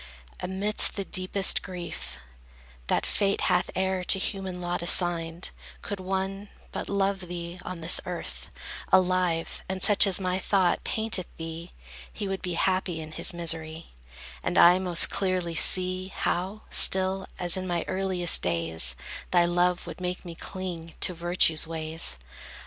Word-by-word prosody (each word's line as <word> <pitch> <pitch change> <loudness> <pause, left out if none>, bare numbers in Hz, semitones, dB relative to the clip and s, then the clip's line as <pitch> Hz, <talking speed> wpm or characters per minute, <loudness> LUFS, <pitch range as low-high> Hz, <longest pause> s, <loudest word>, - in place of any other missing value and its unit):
Amidst 200 +3 +2
the 195 - -4
deepest 185 +1 +1
grief 170 - -7 0.7
That - - 0
fate 200 -1 0
hath 180 -1 +1
e'er 190 -1 -1
to 195 - +4
human 190 -2 -4
lot 175 -1 -3
assigned, 170 -1 +2 0.3
Could 200 - -5
one 195 +2 -4 0.2
but - - -6
love 195 -2 -1
thee 170 0 -7
on 180 -2 -7
this 165 +2 +3
earth, - - -6 0.4
Alive, 185 -3 +1
and 190 -1 -1
such 205 -1 +7
as 190 -1 +2
my 185 -1 -1
thought 190 -3 +1
painteth 220 -6 -1
thee, 165 +1 -7 0.4
He 205 - -5
would 195 0 -4
be 180 -2 -4
happy 185 -3 0
in 155 0 -8
his - - +2
misery: 165 -1 -1 0.5
And - - -2
I 180 +2 +7
most 180 -3 +4
clearly 185 -3 -1
see, 185 +3 +2
how, 190 +2 -3
still, 190 0 +4
As 175 -2 +4
in 185 0 -4
my 175 -1 -2
earliest 185 -3 +1
days, 80 -7 +1 0.3
Thy 175 -1 +4
love 175 +1 +1
would - - -9
make 180 +1 -4
me 170 - -7
cling 170 -2 -7
to 180 - 0
virtue's 170 -2 +3
ways. 160 - -2
180 Hz, 150 wpm, -26 LUFS, 170-190 Hz, 0.7 s, such